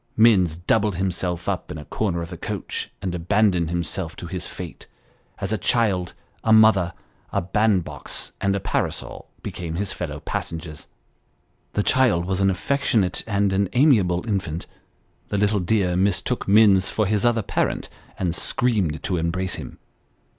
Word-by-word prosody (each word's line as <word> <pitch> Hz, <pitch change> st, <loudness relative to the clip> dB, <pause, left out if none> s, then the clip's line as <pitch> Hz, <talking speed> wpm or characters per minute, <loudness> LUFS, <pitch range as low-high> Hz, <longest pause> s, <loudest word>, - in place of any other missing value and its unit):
Minns 95 Hz, -8 st, +5 dB
doubled 100 Hz, +4 st, +1 dB
himself 90 Hz, -1 st, -2 dB
up -, -, -2 dB
in -, -, -6 dB
a 75 Hz, -, -8 dB
corner 85 Hz, -6 st, -1 dB
of 85 Hz, -, -8 dB
the -, -, -5 dB
coach, -, -, -4 dB
and 90 Hz, -2 st, -2 dB
abandoned 90 Hz, -1 st, +2 dB
himself 85 Hz, 0 st, -3 dB
to -, -, -8 dB
his 90 Hz, +1 st, -5 dB
fate, 90 Hz, -3 st, -9 dB, 0.5 s
as 100 Hz, +2 st, -2 dB
a 110 Hz, -, -1 dB
child, 95 Hz, -4 st, +1 dB, 0.3 s
a 110 Hz, -, +2 dB
mother, 110 Hz, -5 st, +5 dB, 0.4 s
a -, -, +1 dB
bandbox 95 Hz, 0 st, 0 dB
and 100 Hz, 0 st, +2 dB
a -, -, 0 dB
parasol, -, -, -3 dB
became 85 Hz, -2 st, -5 dB
his 95 Hz, +1 st, -2 dB
fellow -, -, -5 dB
passengers. 80 Hz, -2 st, -5 dB, 0.9 s
The 105 Hz, -, +1 dB
child 115 Hz, -11 st, +3 dB
was 95 Hz, +1 st, -1 dB
an 95 Hz, -, +4 dB
affectionate 105 Hz, -1 st, +1 dB
and 100 Hz, -2 st, +1 dB
an 95 Hz, -1 st, +1 dB
amiable 115 Hz, -, +3 dB
infant; 90 Hz, -6 st, -2 dB, 0.6 s
the 105 Hz, -, -2 dB
little 105 Hz, +1 st, +2 dB
dear 90 Hz, -1 st, +1 dB
mistook 100 Hz, +6 st, 0 dB
Minns 100 Hz, -2 st, +5 dB
for 110 Hz, -, 0 dB
his 105 Hz, +1 st, +1 dB
other 120 Hz, -2 st, +2 dB
parent, 100 Hz, -, -1 dB, 0.3 s
and 90 Hz, -3 st, -1 dB
screamed 95 Hz, -6 st, 0 dB
to 90 Hz, -, 0 dB
embrace 85 Hz, +3 st, -1 dB
him. -, -, -8 dB
95 Hz, 155 wpm, -23 LUFS, 85-105 Hz, 0.9 s, Minns